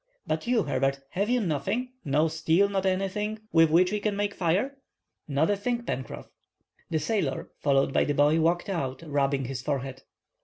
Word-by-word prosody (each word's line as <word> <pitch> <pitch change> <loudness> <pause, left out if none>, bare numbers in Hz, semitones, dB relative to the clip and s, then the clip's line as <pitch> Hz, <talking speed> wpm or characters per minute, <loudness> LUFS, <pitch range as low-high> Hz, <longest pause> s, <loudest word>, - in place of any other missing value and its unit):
But - - -2
you, 240 -4 +3
Herbert, 135 +1 0
have 200 +4 -1
you 250 0 +3
nothing: 195 - -1
no 150 +1 +2
steel, 160 +4 +2
not 195 -1 -1
anything, 195 +3 -1
with 165 -1 +5
which 180 +4 +4
we 210 - 0
can 205 0 -1
make 205 0 -1
fire?" 200 +12 0 0.5
"Not 150 +5 +2
a - - +2
thing, 235 +4 -2
Pencroff." 130 - -5 0.6
The 160 - 0
sailor, 160 -6 -1
followed 135 -1 +2
by - - +3
the 145 - -1
boy, 150 +3 +4
walked 170 +2 +1
out, 140 -8 -3
rubbing 140 -2 0
his 125 -1 -4
forehead. 135 -1 -3
165 Hz, 180 wpm, -27 LUFS, 140-205 Hz, 0.6 s, with